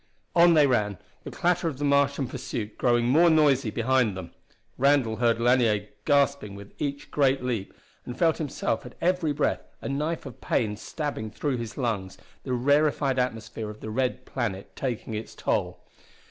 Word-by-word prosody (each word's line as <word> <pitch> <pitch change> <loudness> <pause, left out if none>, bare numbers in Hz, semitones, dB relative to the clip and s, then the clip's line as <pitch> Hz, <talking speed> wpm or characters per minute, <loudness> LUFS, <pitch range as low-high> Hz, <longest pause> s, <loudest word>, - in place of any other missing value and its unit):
On 170 -1 +6
they 150 -2 +6
ran, 105 -7 +1 0.3
the - - -5
clatter 175 -1 0
of 150 -5 -3
the 145 - -2
Martian 140 0 +2
pursuit 120 -4 -5
growing 120 -1 +2
more 165 +7 +5
noisy 145 -6 +4
behind 115 -2 +1
them. 85 -2 -7 0.4
Randall 135 -5 +2
heard 115 0 +2
Lanier 115 -4 +2 0.2
gasping 140 -8 +2
with 100 0 -11
each 145 -1 -3
great 135 -2 +2
leap, 115 -6 -2 0.3
and 125 - -7
felt 165 0 +2
himself 140 -6 -2
at 125 - -11
every 175 -3 +1
breath 145 0 0 0.2
a - - -6
knife 150 +4 -2
of 135 - -10
pain 105 -2 0
stabbing 140 -2 -4
through 130 +4 -2
his 115 -2 -6
lungs, 105 -8 -2 0.2
the 130 - -3
rarified 140 +1 +2
atmosphere 115 -3 -3
of 105 0 -9
the 110 - -6
red 130 +2 -1
planet 105 -7 -4
taking 120 -4 -3
its 110 +1 -6
toll. - - -2
130 Hz, 170 wpm, -26 LUFS, 110-145 Hz, 0.4 s, On